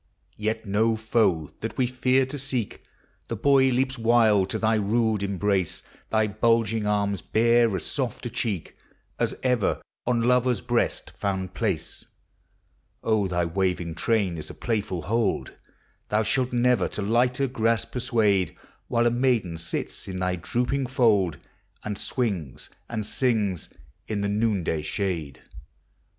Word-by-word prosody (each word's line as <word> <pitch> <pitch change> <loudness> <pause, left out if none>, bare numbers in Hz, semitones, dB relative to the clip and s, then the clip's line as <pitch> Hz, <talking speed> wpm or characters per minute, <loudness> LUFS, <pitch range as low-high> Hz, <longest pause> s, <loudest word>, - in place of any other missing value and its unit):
Yet 110 +1 -2
no 110 +3 +2
foe 110 -8 +1
that - - -5
we 130 - +3
fear 130 +1 +2
to 140 +2 -5
seek, 130 -5 -2 0.2
— - - -40
The 115 - -3
boy 135 +4 +4
leaps 130 0 0
wild 110 -4 +4
to - - -1
thy 110 0 +2
rude 110 0 +1
embrace; 100 -2 0 0.3
Thy 110 0 +2
bulging 110 0 +1
arms 100 -2 0
bear 115 -1 +3
as 85 - -2
soli 130 -6 -2
a - - -2
cheek 110 -7 -3 0.4
As - - 0
ever 125 -5 +1 0.3
on 120 -2 +2
lover's 125 -1 +3
breast 120 +1 -1
found 95 -2 -3
place; - - -2 1.0
On 110 -3 +2
thy 90 -1 0
waving 90 -1 -1
train 95 -2 0
is - - -6
a - - -9
playful 105 -7 -2
hold 115 -2 0 0.6
Thou 105 +1 +2
shalt 125 +4 +1
never 120 -4 +3
to 105 - -4
lighter 125 +5 +2
grasp 115 -3 0
persuade, 110 -7 +1 0.3
While 120 0 +2
a 120 - +4
maiden 120 -9 +1
sits 85 - -4
in 95 -1 -5
thy 90 0 0
drooping 125 +9 -1
fold, 105 - +2 0.5
And 105 -1 -3
swings 100 - -3 0.2
and 110 -3 -3
sings 105 - 0 0.4
in 105 -2 -2
tin' 100 +1 0
noondaj 90 -8 0
Bhade! 85 -9 -3
110 Hz, 145 wpm, -25 LUFS, 95-120 Hz, 1.0 s, boy